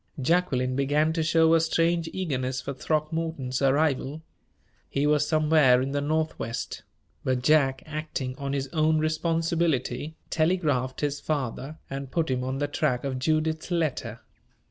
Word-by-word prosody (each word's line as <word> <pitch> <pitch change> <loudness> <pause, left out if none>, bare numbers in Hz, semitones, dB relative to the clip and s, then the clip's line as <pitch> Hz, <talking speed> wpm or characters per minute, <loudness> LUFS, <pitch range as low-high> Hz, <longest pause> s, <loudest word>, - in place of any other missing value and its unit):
Jacqueline 130 -4 +1
began 145 +3 +2
to 165 - 0
show 160 0 +4
a 165 - +6
strange 165 0 +1
eagerness 130 -8 -2
for 140 +2 -5
Throckmorton's 155 -3 -2
arrival. 140 +1 +1 0.7
He 140 +1 0
was 150 0 +3
somewhere 155 -5 +4
in 135 +1 -2
the 145 0 -1
Northwest; 155 -6 -2 0.4
but 130 -1 0
Jack, 135 -3 +3
acting 155 -4 -4
on 140 -1 -3
his 135 -1 -1
own 155 -1 +2
responsibility, 160 -1 0 0.2
telegraphed 155 -6 +1
his 145 -1 -1
father, 145 0 -3
and 135 -1 -5
put 160 -1 0
him 125 -1 0
on 130 +1 -2
the 145 +1 0
track 125 -3 0
of 135 -2 -2
Judith's 155 +3 0
letter. 140 -10 -2
150 Hz, 145 wpm, -26 LUFS, 130-160 Hz, 0.7 s, a